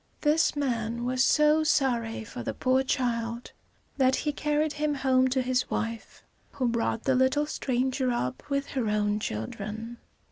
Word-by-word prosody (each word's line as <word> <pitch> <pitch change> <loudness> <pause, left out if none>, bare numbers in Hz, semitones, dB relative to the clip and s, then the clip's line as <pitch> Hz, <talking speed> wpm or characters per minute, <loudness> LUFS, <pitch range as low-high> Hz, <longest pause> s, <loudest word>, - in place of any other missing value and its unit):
This 305 +1 +3
man 235 -4 -2
was 255 +1 +1
so 300 +2 +4
sorry 240 -7 +1
for 245 +3 -8
the 260 - -4
poor 260 0 +2
child, 235 -3 -2 0.5
that 260 -1 +4
he 300 - -1
carried 300 +1 0
him 300 -1 -1
home 260 -1 +3
to 260 0 0
his 250 0 0
wife, 230 0 -4 0.3
who 255 -3 -1
brought 230 -1 -1
the 265 - +2
little 260 +3 +2
stranger 260 -2 -1
up 130 - -2
with 280 0 -1
her 255 -5 -2
own 210 0 +1
children. 215 - -5
255 Hz, 155 wpm, -27 LUFS, 230-280 Hz, 0.5 s, so